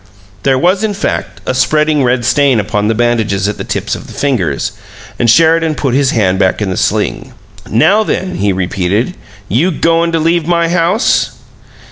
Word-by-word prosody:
There 135 +3 +2
was, 185 +8 +1
in 210 -2 -1
fact, 200 - -3
a - - -1
spreading 150 +3 +1
red 125 -1 0
stain 130 0 +3
upon 105 0 -1
the 110 - +1
bandages 110 -4 0
at 105 - -3
the - - -3
tips - - -3
of - - -6
the - - -11
fingers, 100 - -1 0.5
and 120 - +2
Sheridan 160 +3 +3
put 135 -4 -1
his 135 0 +2
hand 95 -6 +1
back 95 -2 +1
in 100 -3 -2
the - - -2
sling. - - -2 0.3
"Now 195 - +3
then!" 185 -4 -2
he 100 0 +1
repeated. 95 - -1 0.3
"You 135 - +1
goin' 165 0 +1
to 165 - +1
leave 165 0 +1
my 170 -1 +1
house?" 175 +6 +1
135 Hz, 180 wpm, -13 LUFS, 105-165 Hz, 0.5 s, stain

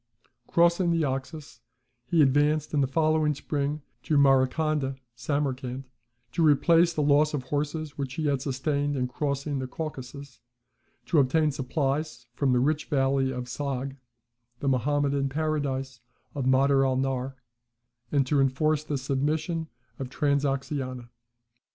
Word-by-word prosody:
Crossing 170 +1 +3
the 165 -1 +2
Oxus, 140 +2 -5 0.5
he 165 -3 +4
advanced 150 +3 +2
in 145 - +3
the 135 - +2
following 155 +1 +2
spring 145 +1 -3 0.2
to 150 - +1
Marakanda 135 +1 +2 0.2
(Samarcand) 130 0 -2 0.5
to - - -1
replace 165 +3 +5
the 155 -3 -1
loss 150 +1 +3
of 135 - -3
horses 145 +2 -3
which 135 -2 -3
he 160 - -2
had 140 -3 +1
sustained 145 +2 -1
in 125 -2 0
crossing 140 +1 -2
the 130 - -3
Caucasus, 140 -2 -7 0.7
to 165 - +3
obtain 150 +3 +3
supplies 135 -1 -2
from 135 +1 +1
the 125 - +3
rich 150 +4 +1
valley 135 -2 +1
of 125 -1 -3
Sogd 135 +1 -4 0.6
(the 140 - -3
Mahometan 140 +1 +1
Paradise 135 -4 -2 0.3
of 140 -3 -3
Mader 135 +1 +4
al 130 -1 +1
Nahr), 135 0 -2 0.8
and 140 -2 +2
to 140 +1 +2
enforce 150 +3 +1
the 150 -2 -2
submission 150 +5 -1 0.3
of 135 -2 -4
Transoxiana. 135 -3 -1
140 Hz, 135 wpm, -27 LUFS, 135-150 Hz, 0.8 s, replace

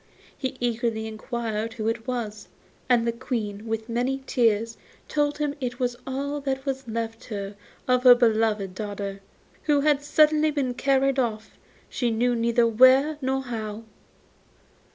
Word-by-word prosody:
He 260 -1 -4
eagerly 230 -2 -1
inquired 220 0 -4
whose 225 -2 -1
it 225 +1 -7
was, 215 -5 -4 0.4
and 240 -2 +4
the 235 - +2
Queen, 230 -3 -4
with 220 0 -3
many 255 +3 -1
tears, 230 -3 +1 0.3
told 295 -1 0
him 295 -1 -1
it 245 -1 -3
was 245 -1 0
all 280 +2 -3
that 270 -1 -3
was 270 -2 -3
left 225 +1 -4
her 200 -2 -5 0.3
of 250 -1 +3
her 250 -1 +9
beloved 220 -5 +1
daughter, 200 -1 -5 0.4
who 290 -2 +3
had 290 -1 +3
suddenly 305 +1 +4
been 280 -4 -1
carried 275 +1 +2
off, 220 -3 -3 0.3
she 245 - -1
knew 240 +2 +1
neither 235 0 +2
where 260 +6 +5
nor 265 0 0
how. 220 -3 -5
240 Hz, 150 wpm, -25 LUFS, 220-265 Hz, 0.4 s, her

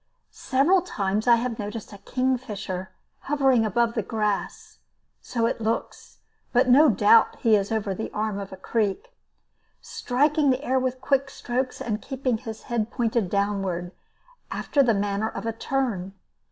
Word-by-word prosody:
Several 290 +8 +2
times 210 - -2
I 240 - +8
have 235 -1 -3
noticed 210 +1 -6
a 200 - -11
kingfisher 215 -8 -2 0.3
hovering 270 -5 +2
above 230 +2 +1
the 225 - 0
grass 210 -1 -3 0.4
(so 230 -2 -1
it 230 - -1
looks, 225 +1 -3 0.3
but 250 +1 +3
no 285 +5 +7
doubt 210 +1 +5
he 225 -3 +5
is 200 0 0
over 215 -3 -1
an 205 +4 -4
arm 210 -1 -2
of 195 -1 -6
the 190 - -10
creek), 230 - -2 0.7
striking 290 +3 +1
the 260 +2 +1
air 260 -1 +1
with 255 0 -2
quick 275 +1 +1
strokes, 250 +1 -3
and 215 -2 -3
keeping 260 -4 -2
his 220 -1 -8
head 230 -2 -2
pointed 230 -5 0
downward, 195 -3 -1 0.6
after 285 - +1
the 235 -5 +3
manner 205 +2 -1
of - - -7
a 225 - -1
tern. 225 -7 -2
230 Hz, 155 wpm, -25 LUFS, 205-260 Hz, 0.7 s, I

